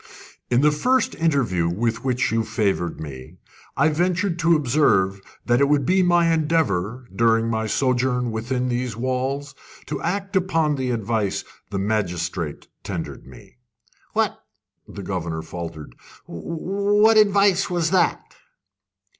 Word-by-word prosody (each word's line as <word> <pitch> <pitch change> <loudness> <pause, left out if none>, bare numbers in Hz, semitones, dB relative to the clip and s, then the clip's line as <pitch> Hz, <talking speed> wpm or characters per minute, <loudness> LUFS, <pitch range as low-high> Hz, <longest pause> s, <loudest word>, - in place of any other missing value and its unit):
"In 120 +1 +3
the 150 +1 +5
first 250 +11 +1
interview 120 - +1
with 115 +5 -1
which 125 -3 0
you 115 0 +1
favoured 100 -6 -1
me, 65 -4 -9 0.4
I - - +4
ventured 175 +3 0
to 165 0 +4
observe 120 -10 +2 0.2
that 120 +2 +2
it 140 - +4
would 145 -2 +2
be 190 +2 +3
my 175 -2 +3
endeavour, 130 - 0
during 115 +1 +3
my 110 0 -1
sojourn 125 0 0
within 125 +3 -2
these 120 -2 -2
walls, 130 +3 -2 0.3
to - - -4
act 195 +4 -3
upon 165 -5 +2
the 130 -3 -2
advice 110 -3 -1 0.3
the 100 - -3
magistrate 90 -6 -2
tendered - - -6
me." - - -15 0.6
"What" - - 0 0.4
the 100 - -8
governor 85 -4 -3
rather - - -14
faltered 80 -6 -7 0.3
"what 200 - +1
advice 200 -2 +3
was 170 -2 0
that?" 185 -2 +2
125 Hz, 135 wpm, -22 LUFS, 105-165 Hz, 0.6 s, the